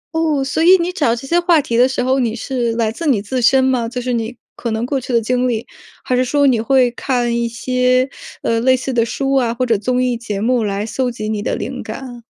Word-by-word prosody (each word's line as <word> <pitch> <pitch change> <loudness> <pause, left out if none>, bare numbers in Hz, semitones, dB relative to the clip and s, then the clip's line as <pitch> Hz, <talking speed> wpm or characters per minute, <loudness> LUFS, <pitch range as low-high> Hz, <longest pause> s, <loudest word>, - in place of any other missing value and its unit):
哦， 310 -4 +1
所 285 +4 -1
以 365 +3 +7
你 350 0 -2
找 285 -10 +1
这 240 - -8
些 340 +6 +2
话 345 -2 +4
题 235 -4 -2
的 250 +2 +4
时 260 -1 -1
候， 260 +1 +1
你 235 -3 0
是 245 -1 -2
来 225 -1 0
自 330 +7 -5
你 255 -8 +3
自 245 +5 -3
身 260 +3 +4
吗？ 250 -3 +1
就 250 +1 -4
是 250 0 -2
你 235 +1 -3 0.2
可 235 - -4
能 220 +1 -1
过 270 0 -2
去 255 - -6
的 235 - +4
经 250 +2 0
历， 230 -1 -2 0.4
还 255 - 0
是 255 - +2
说 285 +3 +2
你 245 -5 +3
会 250 0 +3
看 240 -1 -1
一 235 0 0
些， 250 +2 +1 0.4
呃， 230 0 +1
类 255 +2 +3
似 260 +1 -4
的 230 -1 +3
书 270 +3 -2
啊， 250 -4 +2
或 255 - 0
者 230 -2 +2
综 250 +5 0
艺 250 -1 0
节 230 -4 -5
目 235 +2 +1
来 205 0 -2
搜 250 +2 -1
集 215 -3 -5
你 210 -1 -2
的 235 - -2
灵 - - -5
感？ 245 -3 -8
250 Hz, 275 characters per minute, -18 LUFS, 230-265 Hz, 0.4 s, 以